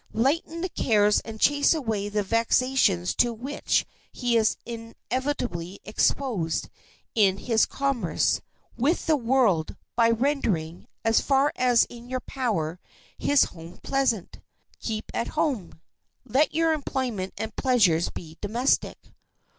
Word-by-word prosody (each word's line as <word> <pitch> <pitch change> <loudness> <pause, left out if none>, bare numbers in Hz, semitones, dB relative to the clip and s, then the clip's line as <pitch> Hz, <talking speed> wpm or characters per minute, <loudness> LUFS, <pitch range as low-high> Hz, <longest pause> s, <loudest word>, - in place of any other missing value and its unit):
Lighten 310 +8 0
the 370 - -2
cares 210 -8 +3
and 220 -1 -9
chase 285 +5 +4
away 220 -8 -2
the 205 0 0
vexations 230 -3 +2
to 240 - +2
which 250 +6 -1 0.3
he 245 -2 -1
is 220 -1 +3
inevitably 230 -5 -4
exposed 210 - 0 0.4
in 195 -4 +3
his 225 +1 +2
commerce 275 -3 0 0.3
with 285 +8 +1
the 320 - +4
world 230 - +2 0.2
by 230 -1 +4
rendering, 225 - -1 0.2
as 225 0 +4
far 275 +1 +2
as 245 -2 +4
is 240 - -2
in 240 +1 -14
your 255 0 -2
power, 185 - -2 0.4
his 285 -2 +4
home 165 +1 -8
pleasant. 265 -8 -1 0.4
Keep 220 -1 -4
at 235 - -1
home. 210 - -1 0.5
Let 265 +6 +2
your 325 0 +3
employment 255 -10 -3
and 220 -1 -5
pleasures 205 - +3
be 160 -1 -10
domestic. 235 +6 +1
230 Hz, 130 wpm, -26 LUFS, 205-270 Hz, 0.5 s, chase